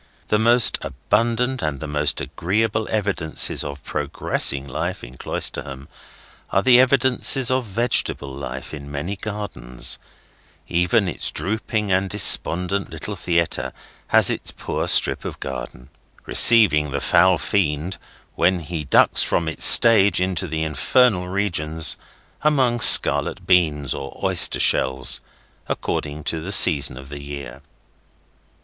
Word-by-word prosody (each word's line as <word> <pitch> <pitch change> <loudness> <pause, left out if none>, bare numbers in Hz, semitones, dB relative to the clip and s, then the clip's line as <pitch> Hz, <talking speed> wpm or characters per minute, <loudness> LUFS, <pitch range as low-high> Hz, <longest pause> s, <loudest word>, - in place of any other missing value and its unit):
The 105 - +1
most 120 +1 +3
abundant 115 - -2
and 75 -3 -4
the 80 - -7
most 75 0 -2
agreeable 110 +4 -3
evidences 100 -7 -1
of 70 -1 -9
progressing 70 -1 -2
life - - -5
in - - -12
Cloisterham 65 +2 -4 0.6
are - - 0
the 125 -1 +5
evidences 130 0 +2
of 130 -1 -1
vegetable 100 - -2
life 65 0 -9
in 70 -1 -10
many 75 +8 -5
gardens; 100 - -5 0.7
even 90 +4 0
its 90 - -2
drooping 105 0 -4
and 95 +1 0
despondent 95 -1 +2
little - - -8
theatre 85 -1 -2 0.3
has - - +4
its - - -4
poor - - -5
strip - - +1
of - - -8
garden, 60 -1 -9 0.4
receiving 85 -11 +4
the 70 +1 -4
foul 90 +4 +2
fiend, 85 0 -3 0.3
when 90 +2 0
he 80 0 -6
ducks 70 - +2
from 85 - -1
its 80 - -1
stage 100 -6 +6
into 90 0 -3
the 80 0 -4
infernal 90 - 0
regions, 80 -6 -2 0.5
among 130 -6 0
scarlet - - +7
beans 75 -6 0
or 70 -1 -9
oyster - - +2
shells, 65 0 0 0.5
according 75 0 -5
to 80 +1 -4
the 95 +5 -6
season 70 -9 +6
of 65 +1 -12
the 70 0 -9
year. 70 -2 -10
85 Hz, 130 wpm, -20 LUFS, 70-105 Hz, 0.7 s, scarlet